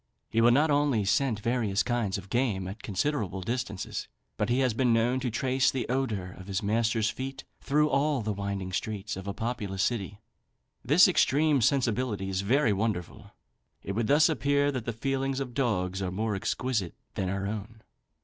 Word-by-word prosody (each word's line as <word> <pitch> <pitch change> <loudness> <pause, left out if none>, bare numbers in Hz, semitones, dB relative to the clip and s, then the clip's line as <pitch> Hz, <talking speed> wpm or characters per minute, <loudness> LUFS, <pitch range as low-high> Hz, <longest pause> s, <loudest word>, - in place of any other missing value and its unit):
He 115 - +2
will 120 - +6
not 145 +5 +4
only 145 -7 +2
scent 110 +1 +1
various 110 -4 +1
kinds 120 -6 -1
of 100 0 -10
game 110 -7 0
at 100 +4 -7
considerable 100 -2 -2
distances, 115 -2 -4 0.3
but 105 +1 -1
he 120 - +2
has 130 -3 +2
been 125 +1 +2
known 115 +3 +2
to 130 -1 -2
trace 130 +3 +1
the 130 - -2
odour 115 -8 -1
of 95 - -10
his 100 +2 -2
master's 115 +1 +1
feet 130 +4 -6 0.2
through 150 +2 +2
all 145 -2 +1
the 105 0 -1
winding 100 -2 -4
streets 105 +1 -3
of 95 +1 -7
a 100 - -2
populous 105 -5 -2
city. 105 -4 -2 0.7
This 150 - +6
extreme 150 -5 +3
sensibility 120 -5 +1
is 95 0 -1
very 115 +2 +3
wonderful. 100 -4 -3 0.5
It - - -4
would 110 +2 -1
thus 150 +2 +5
appear 145 -2 +1
that 130 -5 -4
the 120 - -1
feelings 135 +3 -1
of 130 -3 -4
dogs 100 -8 0
are 95 - -1
more 105 +3 -1
exquisite 105 -1 -2 0.2
than 95 - -2
our 100 +1 -2
own. 110 +2 -6
115 Hz, 180 wpm, -28 LUFS, 100-130 Hz, 0.7 s, will